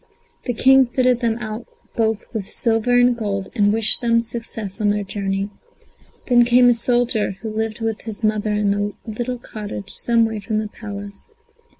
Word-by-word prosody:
The 245 - -2
King 265 +2 +5
fitted 250 0 +2
them 230 -2 0
out 220 0 -6 0.3
both 220 -1 0
with 210 -4 -4
silver 225 +1 +1
and 245 0 +4
gold, 200 -4 -3
and 205 -1 +3
wished 220 0 +2
them 230 -1 +3
success 225 -3 -5
on 210 - +3
their 205 0 0
journey. 195 0 -3 0.8
Then 240 -1 +6
came 245 +1 +5
a - - +6
soldier, 235 -3 +1
who 220 - -3
lived 220 +1 -3
with 225 -1 -2
his 220 0 -4
mother 215 0 +1
in 210 -1 +1
a 205 0 -2
little 240 +3 -3
cottage 210 -4 -7
some 230 -1 +2
way 220 -1 -3
from 215 +2 -2
the 215 -1 -2
Palace. 205 -2 -9
220 Hz, 180 wpm, -21 LUFS, 205-235 Hz, 0.8 s, Then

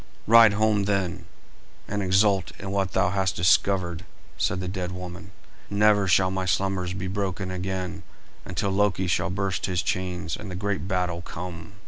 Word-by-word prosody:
"Ride 115 -1 +7
home, 105 -1 +2
then, 95 -3 -1 0.6
and 105 0 -2
exult 95 -1 +2
in 95 -1 -5
what 100 -2 -1
thou 95 -1 +2
hast 95 -3 0
discovered," 85 0 +2 0.3
said 90 - 0
the 95 - -4
dead 90 -1 -3
woman. 90 +2 -8 0.4
"Never 105 -1 +3
shall 95 0 +4
my 95 0 -2
slumbers 95 0 0
be 95 0 -4
broken 95 -1 -3
again 95 0 -4 0.4
until 95 +1 -2
Loki 95 -2 +1
shall 90 - 0
burst 95 0 -2
his 90 -2 -1
chains 90 -4 -2
and 100 - -8
the 90 - -5
great 100 0 -2
battle 90 -3 -1
come." 85 0 -8
95 Hz, 160 wpm, -25 LUFS, 90-100 Hz, 0.6 s, Ride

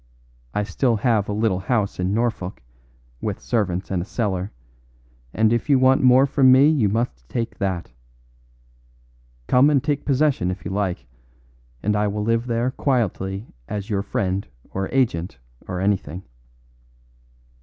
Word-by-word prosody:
I 105 - +1
still 115 +5 +1
have 110 -2 +1
a - - 0
little 105 -3 +1
house 100 +1 -1
in 90 +1 0
Norfolk, 110 - -2 0.6
with - - -3
servants 95 -6 -1
and 90 -2 0
a - - -2
cellar, 100 -4 -2 0.8
and 110 - +2
if 120 +5 -1
you 140 - +6
want 130 +1 +4
more 130 +1 +6
from 135 -1 +4
me 135 +3 +7
you 135 -10 +2
must 95 - -2
take 115 -1 -3
that. 95 -7 -2 1.5
Come 130 - +5
and 140 -3 +2
take 145 -1 -1
possession 140 -9 +1
if 90 +1 -5
you 90 - -3
like, 95 -2 -2 0.8
and 105 +1 +1
I 105 0 +1
will 105 +1 -2
live 115 +2 0
there 120 +1 0
quietly 105 -7 -1 0.2
as 105 +4 -5
your 100 -1 +1
friend 100 -1 -2 0.2
or 95 0 -3
agent 110 -10 0 0.3
or 90 - -3
anything. 95 -3 -1
105 Hz, 150 wpm, -22 LUFS, 95-125 Hz, 1.5 s, me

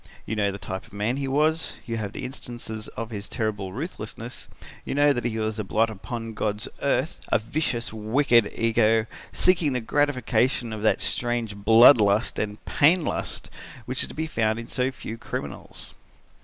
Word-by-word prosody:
You 110 - -3
know 100 -2 +1
the 100 - -6
type 95 -1 -6
of - - -21
man 105 +5 -1
he 140 -1 -2
was, 155 +4 +1
you 115 -2 -3
have 105 -2 -4
instances 120 -4 -5
of 115 +1 -4
his 100 -2 -5
terrible 105 -5 -2
ruthlessness, 115 - -6 0.4
you - - -4
know 145 0 +5
that 120 -2 -3
he 115 -2 -1
was 110 0 -2
a - - -1
blot 110 +3 +1
upon 115 +2 -6
God's 105 -1 -2
earth, - - 0
a - - +5
vicious 120 0 -2
wicked 115 +2 +3
ego, 115 -1 +3 0.3
seeking 175 -6 +3
the 125 - 0
gratification 130 -2 +1
of 110 - -5
that 110 - +2
strange 120 -3 -1
blood 110 +5 +7
lust 105 +3 +2
and 105 0 -4
pain 165 +4 +4
lust, - - -3 0.3
which 130 +1 -1
is - - -2
to - - -10
be 160 - -1
found 110 -7 0
in 115 0 -6
so 125 0 0
few 115 -3 -7
criminals." - - -7
115 Hz, 180 wpm, -25 LUFS, 110-130 Hz, 0.4 s, blood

